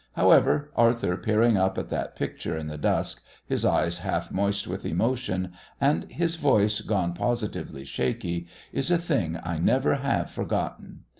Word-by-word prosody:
However, 150 Hz, 0 st, +4 dB
Arthur 115 Hz, -6 st, +3 dB
peering 110 Hz, +2 st, +3 dB
up 95 Hz, 0 st, +1 dB
at -, -, -3 dB
that -, -, -3 dB
picture 80 Hz, -, -3 dB
in 80 Hz, -, -4 dB
the 75 Hz, 0 st, -5 dB
dusk, -, -, 0 dB, 0.2 s
his -, -, -1 dB
eyes 85 Hz, 0 st, +2 dB
half -, -, -2 dB
moist 100 Hz, +1 st, 0 dB
with 95 Hz, +2 st, -5 dB
emotion, 115 Hz, -7 st, -1 dB, 0.3 s
and 140 Hz, +2 st, +1 dB
his 170 Hz, 0 st, -1 dB
voice 105 Hz, -9 st, +3 dB
gone 95 Hz, -5 st, 0 dB
positively 105 Hz, -, -3 dB
shaky, 85 Hz, +7 st, -2 dB, 0.3 s
is 135 Hz, -, 0 dB
a 175 Hz, -, +4 dB
thing 135 Hz, -, -1 dB
I 85 Hz, -1 st, -3 dB
never 130 Hz, -, +3 dB
have 140 Hz, 0 st, -1 dB
forgotten. -, -, -3 dB
105 Hz, 155 wpm, -26 LUFS, 85-130 Hz, 0.3 s, However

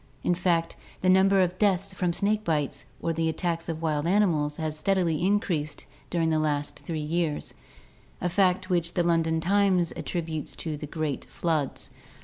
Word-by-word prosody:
In 180 Hz, -, +2 dB
fact, 170 Hz, -2 st, +1 dB, 0.3 s
the 185 Hz, -, +2 dB
number 190 Hz, +1 st, +5 dB
of 180 Hz, 0 st, 0 dB
deaths 195 Hz, -2 st, +2 dB
from 180 Hz, -3 st, 0 dB
snake 210 Hz, +4 st, 0 dB
bite 150 Hz, -6 st, -1 dB, 0.2 s
or 165 Hz, -, +1 dB
the 165 Hz, 0 st, 0 dB
attacks 165 Hz, +1 st, -2 dB
of 165 Hz, 0 st, -4 dB
wild 155 Hz, -1 st, 0 dB
animals 170 Hz, -7 st, +2 dB
has 155 Hz, -1 st, -2 dB
steadily 170 Hz, -2 st, +1 dB
increased 170 Hz, -7 st, 0 dB, 0.2 s
during 165 Hz, -2 st, +1 dB
the 155 Hz, -, +2 dB
last 145 Hz, -1 st, -1 dB
three 165 Hz, -, -5 dB
years 155 Hz, 0 st, -2 dB, 0.3 s
— -, -, -30 dB
a 180 Hz, -, 0 dB
fact 185 Hz, 0 st, +2 dB
which 170 Hz, -1 st, 0 dB
the 175 Hz, -, +2 dB
London 165 Hz, -1 st, +2 dB
Times 185 Hz, -1 st, +2 dB
attrib 170 Hz, -2 st, -3 dB
utes 155 Hz, -2 st, -4 dB
to 160 Hz, -2 st, -4 dB
the 150 Hz, 0 st, -7 dB
great 155 Hz, -2 st, -3 dB
floods. 155 Hz, -5 st, -2 dB
170 Hz, 175 wpm, -27 LUFS, 155-185 Hz, 0.3 s, number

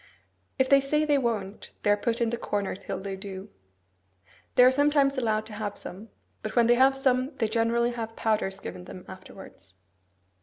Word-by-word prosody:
If 260 Hz, -1 st, +3 dB
they 275 Hz, 0 st, +6 dB
say 300 Hz, +3 st, +1 dB
they 290 Hz, -2 st, +3 dB
won't, 215 Hz, -5 st, -3 dB
they 205 Hz, -, +3 dB
are -, -, +5 dB
put 230 Hz, +3 st, -2 dB
in 230 Hz, -1 st, +1 dB
the -, -, 0 dB
corner 205 Hz, -4 st, -2 dB
till 195 Hz, 0 st, -6 dB
they 195 Hz, 0 st, -5 dB
do. 190 Hz, 0 st, -8 dB, 1.1 s
They 250 Hz, -, +7 dB
are 255 Hz, -, +7 dB
sometimes 285 Hz, 0 st, +3 dB
allowed 220 Hz, -4 st, 0 dB
to 220 Hz, -, -9 dB
have 205 Hz, -1 st, -4 dB
some; 205 Hz, +5 st, -9 dB, 0.3 s
but 215 Hz, -, -5 dB
when 235 Hz, -1 st, +5 dB
they 240 Hz, -, +5 dB
have 265 Hz, +2 st, +4 dB
some, 260 Hz, +1 st, +1 dB
they 225 Hz, -, 0 dB
generally 230 Hz, +2 st, +1 dB
have 225 Hz, -2 st, -5 dB
powders 210 Hz, -3 st, -1 dB
given 180 Hz, -2 st, -8 dB
them 180 Hz, -, -10 dB
afterwards. 185 Hz, -, -13 dB
225 Hz, 190 wpm, -27 LUFS, 200-260 Hz, 1.1 s, They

